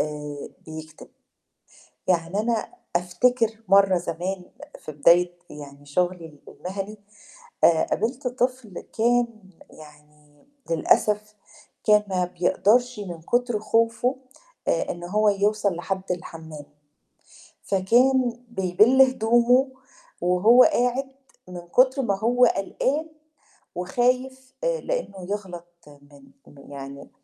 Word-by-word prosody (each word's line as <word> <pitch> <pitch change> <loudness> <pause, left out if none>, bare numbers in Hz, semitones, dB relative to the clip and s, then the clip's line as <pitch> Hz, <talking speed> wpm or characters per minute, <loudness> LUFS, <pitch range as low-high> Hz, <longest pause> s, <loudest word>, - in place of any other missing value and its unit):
آآ 150 -1 -5 0.2
بيكتب. 155 -1 -10 1.0
يعني 175 +2 +1
أنا 230 +5 -2 0.2
أفتكر 220 +6 +1
مرّة 195 -1 +5
زمان 180 +2 -4 0.3
في 155 - -9
بداية 175 +4 +3
يعني 145 -1 -11
شُغلي 175 +3 -1
ال 150 -2 -16
المهني 195 +3 -7 0.7
آآ 165 -1 +5
قابِلت 245 +5 -2
طفل 250 -5 -3
كان 230 -3 -1 0.2
يعني 150 - -18 0.2
للأسف، 210 +6 +1 0.5
كان 210 -1 +4
ما 185 -2 0
بيقدرش 210 +7 +1
من 175 -5 -7
كُتر 240 +3 0
خوفُه 230 +4 +1 0.5
آآ - - 0
إن 175 0 -6
هو 210 +4 +1
يوصَل 205 -1 +1
لحدّ 190 +2 -3
الحمّام، 160 -3 -8 1.0
فكان 245 +5 +2
بيبِل 215 +5 +3
هدومُه 250 +1 +3 0.5
وهو 190 +8 +5
قاعِد، 250 +2 +1 0.4
من 180 -1 -7
كُتر 260 +8 +3
ما 200 -6 -1
هو 245 +3 +3
قلقان 270 +9 -1 0.7
وخايف، 255 +7 -1
آآ - - 0
لأنه 200 - -4
يغلط 185 -4 -5 0.2
من 145 -1 -18 0.2
م 145 0 -15
يعني 140 0 -9
195 Hz, 105 wpm, -24 LUFS, 170-240 Hz, 1.0 s, مرّة